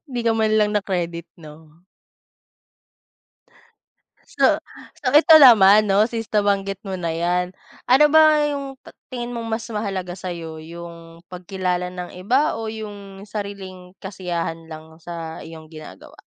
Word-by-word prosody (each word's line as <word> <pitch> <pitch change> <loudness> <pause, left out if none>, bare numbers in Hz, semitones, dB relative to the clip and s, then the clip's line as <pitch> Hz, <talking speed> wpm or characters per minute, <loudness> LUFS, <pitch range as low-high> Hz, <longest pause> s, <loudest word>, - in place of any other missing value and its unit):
Di 240 - -1
ka 225 - +4
man 220 -1 +1
lang 210 -1 +2
na-credit, 175 -5 -2
'no? 155 +2 -16 2.5
So - - +3 0.4
so, - - 0
ito 320 0 +7
naman, 210 -4 +7
'no, 200 +2 +4
since 225 -1 -5
nabanggit 200 -2 0
mo 190 - -5
na 175 -2 -3
yan. 175 +2 -1 0.4
Ano 265 +4 +6
ba 310 -1 +6
yung 280 -2 -4
ti - - -13 0.2
tingin 245 -1 -5
mong 230 -1 -5
mas 225 +1 -3
mahalaga 195 -4 -3
sa'yo, 170 -3 -7
yung 170 0 -11
pagkilala 180 0 -3
ng 180 -1 -8
iba 245 +12 +1
o 225 -1 -5
yung 205 -3 -9
sariling 195 -3 -8
kasiyahan 170 -4 -5
lang 160 +1 -12
sa 165 -1 -7
iyong 160 -1 -11
ginagawa? 155 -12 -12
190 Hz, 135 wpm, -21 LUFS, 170-215 Hz, 2.5 s, ito